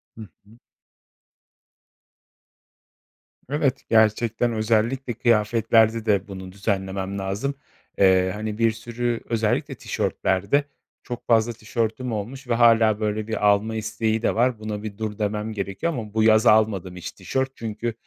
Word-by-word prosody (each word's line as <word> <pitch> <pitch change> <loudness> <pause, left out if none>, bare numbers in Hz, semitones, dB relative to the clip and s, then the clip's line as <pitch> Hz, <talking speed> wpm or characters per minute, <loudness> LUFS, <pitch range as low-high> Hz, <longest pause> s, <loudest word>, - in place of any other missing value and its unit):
Hı 110 - -10 0.2
hı. 110 +3 -19 2.9
Evet, 140 -2 0
gerçekten 115 +1 +2
özellikle 115 +4 0
kıyafetlerde 115 -1 +2
de 100 -3 +1
bunu 95 -2 -8
düzenlemem 95 -1 -3
lazım. 100 +9 -3 0.4
Eee, 95 -1 +4
hani, 105 0 -4
bir 115 0 +3
sürü 120 +1 -3
özellikle 110 -2 0
tişörtlerde 100 +10 0 0.4
çok 120 - -7
fazla 115 0 +3
tişörtüm 115 +3 -3
olmuş 120 +5 -5
ve 120 - +1
hâlâ, 115 -2 +4
böyle, 105 0 -2
bir 110 -2 0
alma 105 +2 +2
isteği 110 0 -1
de - - 0
var. 120 0 +1
Buna 105 -1 -5
bir 105 -2 -6
dur 110 -2 -4
demem 105 +1 -2
gerekiyor. 100 - -3
Ama 110 -6 -6
bu 110 0 +2
yaz 110 +1 +5
almadım 105 -5 +3
hiç 90 - -7
tişört. 130 +8 -2
Çünkü, 115 +1 -4
110 Hz, 135 wpm, -23 LUFS, 105-115 Hz, 2.9 s, yaz